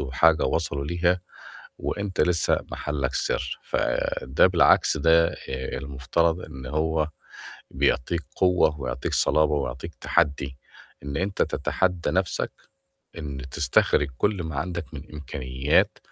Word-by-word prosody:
وحاجة 75 +4 +3
وصلوا 70 0 -1
ليها، 85 +2 +1 0.6
وأنت 100 -2 -2
لسّه 90 -2 +2
محلّك 70 -3 -2
سِر. - - -1
فده 65 +1 +1
بالعكس - - +4
ده 85 0 +5
آآ 65 -4 -5
المفترض 70 +6 0
إن 65 -1 -9
هو 80 +1 0 0.6
بيعطيك 80 +6 0
قوة 90 -5 +3
ويعطيك 65 0 -3
صلابة 75 -1 +3
ويعطيك 70 +3 -4
تحدّي، 70 -2 0 0.5
إن 70 -1 -4
أنت 95 +1 0
تتحدّى 90 -2 0
نَفْسك، 95 -1 -1 0.7
إن 70 -4 -5
تستخرج 70 +3 +2
كل 100 -4 +1
ما 80 -3 -5
عندك 85 -1 -4
من 70 - -6
إمكانيات 70 -1 0
75 Hz, 115 wpm, -25 LUFS, 70-85 Hz, 0.7 s, ده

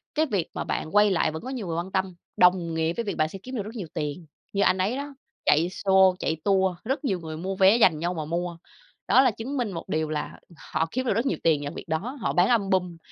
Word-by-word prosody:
cái 310 +1 +3
việc 200 - -1
mà - - -3
bạn 160 +6 -4
quay 205 -1 +6
lại 170 - +2
vẫn 160 +7 -7
có 260 - -6
nhiều 240 -8 -4
người 165 0 -2
quan 180 +3 -4
tâm, 190 -2 -1 0.2
đồng 180 -2 +4
nghĩa 160 +1 0
với 235 - -3
việc 200 - -4
bạn 155 0 +2
sẽ 195 - -8
kiếm 255 +1 -7
được 210 - -2
rất 220 +4 -9
nhiều 190 -7 -5
tiền. 150 +3 -4 0.3
Như 200 - +1
anh 185 - +3
ấy 205 +8 0
đó, 285 0 -6 0.3
chạy 160 +4 +4
show, 190 -1 +4
chạy 160 - -1
tour, 190 -2 +2
rất 270 +4 -2
nhiều 190 -7 0
người 160 -1 -7
mua 190 +3 -3
vé 195 +4 +5
dành 160 -9 +4
nhau 175 +2 -1
mà 155 -3 -4
mua. 170 +1 -3 0.5
Đó 260 - +6
là 255 -3 +4
chứng 255 +7 -5
minh 235 -5 -1
một 165 - -7
điều 155 0 -1
là 150 -1 -4 0.3
họ 160 +1 +1
kiếm 255 +1 -2
được 235 - +2
rất 230 +6 0
nhiều 275 - 0
tiền 155 -3 +3
nhờ 145 - -4
việc - - -7
đó, 160 - +2 0.2
họ - - 0
bán 180 +2 +4
album, 190 -6 +1
185 Hz, 270 wpm, -26 LUFS, 165-215 Hz, 0.5 s, quay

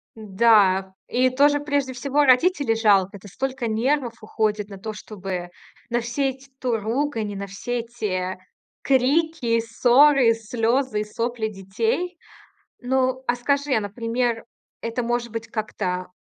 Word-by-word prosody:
Н-да. 195 -3 +3
И 255 +1 +2
тоже 290 +3 +3
прежде 285 -3 -1
всего 280 +3 +1
родителей 275 -1 +3
жалко. 200 -3 +3
Это 200 - -14
столько 265 +1 -3
нервов 235 +1 0
уходит 215 -1 -1
на 195 - -9
то, 215 +3 -5
чтобы 190 -4 -6 0.4
на 240 0 0
все 265 +4 -1
эти 265 +1 -10
то 245 -3 0
ругань, 225 -1 -1
и - - -6
на 200 - -5
все 240 +5 -4
эти, 210 -6 -3
э, - - -14 0.4
крики, 270 -2 +2
ссоры, 245 +2 +5
слёзы 225 +1 0
и - - -1
сопли 230 +1 -2
детей. 225 - -2 0.6
Ну, 260 0 0
а 240 - +2
скажи, 280 +3 0
а, 220 - +2
например, 230 +3 -2 0.4
это, 230 +2 -2
может 235 -1 -1
быть, 225 0 -5
как-то 185 -4 -3
235 Hz, 145 wpm, -23 LUFS, 215-260 Hz, 0.6 s, ссоры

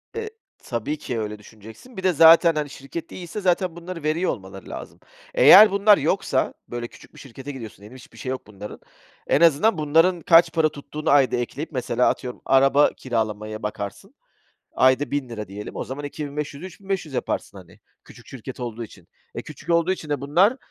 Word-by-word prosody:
Eee, 450 -1 -4 0.3
tabii 125 +5 -3
ki, 120 -5 -4
öyle 105 -1 -5
düşüneceksin, 110 - -15
bir 190 - -6
de 185 -1 +3
zaten, 165 +1 +7
hani, 150 -1 -2
şirket 140 +4 -8
de - - -11
iyiyse, 180 +3 -7
zaten 180 -2 0
bunları 170 -1 -8
veriyor 160 +4 0
olmaları 95 -1 -9
lazım. - - -9 0.3
Eğer 210 +1 +8
bunlar 200 +1 +5
yoksa, 145 -3 0
böyle, 120 0 -5
küçük - - -18
bir - - -15
şirkete 135 +1 -9
gidiyorsun 120 -6 -9
diyelim, 105 +5 -13
hiçbir 130 - -16
şeyi 130 - -5
yok 130 - -6
bunların. 105 0 -10 0.5
En 145 - +2
azından, 170 +6 +4
bunların 165 +4 +2
kaç 165 +1 +5
para 160 -2 +2
tuttuğunu 150 +1 -6
ayda 140 -2 +4
ekleyip, 130 +6 -4
mesela, 125 -3 +1
atıyorum, 125 -1 -5
araba 135 +2 +4
kiralamaya 110 -3 -3
bakarsın. 105 - -6 0.6
Ayda 130 +2 +3
₺1000 120 -7 -4
diyelim. 100 +2 -8
O - - -3
zaman, 140 +3 -7
2500'ü 145 +2 -6
3.500 190 -5 -5
yaparsın, 100 - -3
hani. 90 -3 -17 0.2
Küçük 120 - -16
şirket 130 0 -9
olduğu 120 -1 -5
için. 90 -5 -16 0.3
E, - - -5
küçük 170 - -10
olduğu 170 +2 +3
için 165 -4 -7
de 145 -2 -2
bunlar, 180 - +3
145 Hz, 180 wpm, -23 LUFS, 120-170 Hz, 0.6 s, Eğer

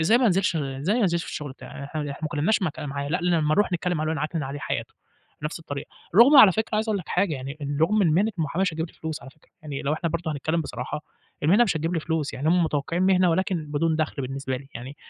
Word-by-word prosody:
إزاي 220 +9 +4
ما 250 - +3
انزلش، 190 -3 +2
إزاي 140 - -1
ما 245 - +2
انزلش 170 -4 +1
في - - -7
الشُغل 150 -2 -5
بتاعي 140 - -9
إحنا 155 +2 -4
إحنا 145 -1 -3
ما - - 0
اتكلّمناش 165 +7 +1
مك 160 -5 -2
معاه، 140 -1 -4
لأ 175 +5 0
لمّا 165 -4 +2
نروح 205 0 +2
نتكلّم 175 0 0
معاه 155 0 -1
نعكنِن 155 +1 -2
عليه 140 +1 -5
حياته، - - -4 0.5
بنَفْس 150 +3 -3
الطريقة. 140 -2 -6 0.3
رغم 245 +8 +8
على 215 -8 +10
فكرة 220 +2 -2
عايز 220 +1 0
أقول 210 -2 +1
لك 175 - -9
حاجة، 180 -3 +1
يعني 135 +2 -6
إن 140 0 -2
رغم 205 +6 +3
إن 175 - +4
مهنة 205 +6 +3
المُحاماة 160 +4 0
مش 190 - +1
هتجيب 160 +1 -2
لي - - -17
فلوس 160 -1 -5
على 135 - -11
فكرة، 150 - -28
يعني 145 -3 -5
لو 140 - 0
إحنا 155 +2 -1
برضه 165 -1 -2
هنتكلّم 155 +3 -1
بصراحة 145 0 -5 0.4
المهنة 195 +10 +5
مش 195 -7 0
هتجيب 165 +3 -1
لي 165 - 0
فلوس. 155 -1 -2
يعني 145 +4 -1
هم 175 +1 +4
متوقّعين 160 +3 -1
مهنة 185 -1 +4
ولكن 175 -2 0
بدون 155 +2 0
دَخْل 155 -3 -2
بالنسبة 130 0 -3
لي. 135 +2 -10
يعني 130 +5 -8
160 Hz, 260 wpm, -25 LUFS, 145-180 Hz, 0.5 s, على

